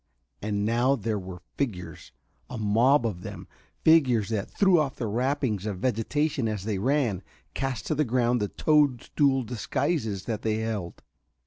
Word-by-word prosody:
And 100 Hz, 0 st, -1 dB
now 120 Hz, +5 st, +2 dB
there 110 Hz, -5 st, -2 dB
were 90 Hz, -1 st, -9 dB
figures 90 Hz, -, -4 dB, 0.4 s
a 125 Hz, -, -6 dB
mob 115 Hz, +5 st, +3 dB
of 95 Hz, -6 st, -3 dB
them -, -, -8 dB, 0.4 s
figures 130 Hz, -10 st, +4 dB
that 105 Hz, -3 st, -2 dB
threw 190 Hz, -4 st, +4 dB
off 140 Hz, -3 st, -1 dB
their 115 Hz, -, -3 dB
wrappings 120 Hz, -2 st, -1 dB
of 100 Hz, -3 st, -3 dB
vegetation 130 Hz, +5 st, 0 dB
as 105 Hz, -3 st, -3 dB
they 105 Hz, -2 st, -2 dB
ran, 125 Hz, -5 st, +1 dB, 0.3 s
cast 130 Hz, -5 st, -3 dB
to -, -, 0 dB
the 150 Hz, 0 st, +2 dB
ground 120 Hz, -2 st, +1 dB
the 105 Hz, -, +1 dB
toadstool 140 Hz, -1 st, +2 dB
disguises 120 Hz, -, -2 dB
that 110 Hz, -2 st, -3 dB
they 110 Hz, -1 st, 0 dB
held. 110 Hz, -6 st, -4 dB
115 Hz, 155 wpm, -27 LUFS, 105-135 Hz, 0.4 s, figures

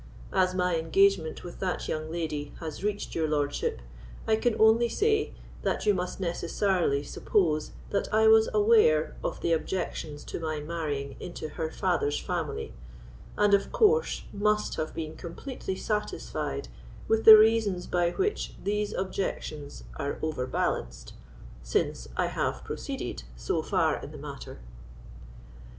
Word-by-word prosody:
As 185 Hz, 0 st, +2 dB
my 180 Hz, -2 st, +1 dB
engagement 165 Hz, 0 st, +2 dB
with 175 Hz, -, -9 dB
that 185 Hz, -2 st, -2 dB
young 155 Hz, 0 st, -3 dB
lady 155 Hz, -4 st, -3 dB
has 160 Hz, +1 st, -6 dB
reached 205 Hz, 0 st, -2 dB
your 160 Hz, -1 st, 0 dB
lordship, 145 Hz, -, -1 dB, 0.5 s
I 220 Hz, -, +4 dB
can 220 Hz, +1 st, 0 dB
only 225 Hz, +2 st, +5 dB
say, 430 Hz, -, +1 dB, 0.3 s
that -, -, -1 dB
you 210 Hz, -, +5 dB
must 180 Hz, 0 st, -3 dB
necessarily 170 Hz, -4 st, 0 dB
suppose 155 Hz, 0 st, 0 dB, 0.2 s
that 200 Hz, -, -1 dB
I 220 Hz, +1 st, +4 dB
was 220 Hz, 0 st, +6 dB
aware 210 Hz, -8 st, +4 dB
of -, -, -3 dB
the 170 Hz, -, +2 dB
objections 160 Hz, -3 st, -3 dB
to -, -, -5 dB
my 155 Hz, -2 st, -2 dB
marrying 150 Hz, -3 st, -4 dB
into 165 Hz, -3 st, -6 dB
her 160 Hz, +1 st, -3 dB
father's 165 Hz, -4 st, 0 dB
family, -, -, -3 dB, 0.6 s
and 205 Hz, -1 st, +4 dB
of 200 Hz, -, +3 dB
course 465 Hz, +2 st, +3 dB
must 210 Hz, +1 st, +1 dB
have 155 Hz, -, -3 dB
been 160 Hz, -1 st, -5 dB
completely 190 Hz, +3 st, -6 dB
satisfied 210 Hz, -, -3 dB, 0.4 s
with 225 Hz, 0 st, +2 dB
the 220 Hz, -1 st, +12 dB
reasons 215 Hz, -4 st, +3 dB
by 175 Hz, -1 st, +1 dB
which 400 Hz, -, -1 dB
these 210 Hz, +1 st, -1 dB
objections 170 Hz, -6 st, -4 dB
are 140 Hz, 0 st, -3 dB
overbalanced, 125 Hz, -, -2 dB, 0.5 s
since -, -, -1 dB
I -, -, +2 dB
have -, -, -2 dB
proceeded -, -, -5 dB
so -, -, -1 dB
far -, -, +1 dB
in -, -, -8 dB
the -, -, -10 dB
matter." -, -, -8 dB
180 Hz, 140 wpm, -28 LUFS, 155-210 Hz, 0.6 s, the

